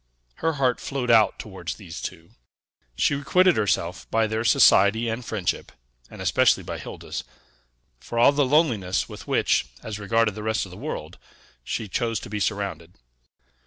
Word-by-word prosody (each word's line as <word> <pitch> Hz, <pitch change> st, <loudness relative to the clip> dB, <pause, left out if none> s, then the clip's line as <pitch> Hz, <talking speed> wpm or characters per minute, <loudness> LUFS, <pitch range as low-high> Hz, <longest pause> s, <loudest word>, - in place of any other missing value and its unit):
Her 165 Hz, -, 0 dB
heart 130 Hz, -4 st, +1 dB
flowed 130 Hz, -3 st, -2 dB
out 110 Hz, -2 st, +5 dB
towards -, -, -6 dB
these 80 Hz, -, -9 dB
two; 80 Hz, +1 st, -8 dB, 0.6 s
she -, -, +2 dB
requited 180 Hz, +5 st, +3 dB
herself 95 Hz, -4 st, -1 dB
by 110 Hz, 0 st, +2 dB
their 110 Hz, +1 st, -2 dB
society 110 Hz, 0 st, +5 dB
and 115 Hz, +2 st, -3 dB
friendship 105 Hz, -6 st, -3 dB, 0.4 s
(and -, -, -8 dB
especially -, -, +3 dB
by -, -, -6 dB
Hilda's) -, -, -7 dB, 0.8 s
for 115 Hz, -, -7 dB
all 120 Hz, +4 st, +6 dB
the 145 Hz, 0 st, +2 dB
loneliness 125 Hz, -, +1 dB
with -, -, -10 dB
which, 65 Hz, -, +2 dB, 0.2 s
as 105 Hz, -1 st, -6 dB
regarded 110 Hz, +1 st, +1 dB
the 105 Hz, -, -7 dB
rest 110 Hz, -1 st, -1 dB
of 95 Hz, -, -12 dB
the -, -, -10 dB
world, -, -, -6 dB, 0.4 s
she 110 Hz, -, -3 dB
chose 115 Hz, +2 st, -1 dB
to 115 Hz, -, -10 dB
be 105 Hz, -, -2 dB
surrounded. 95 Hz, -5 st, -3 dB
110 Hz, 165 wpm, -24 LUFS, 100-125 Hz, 0.8 s, all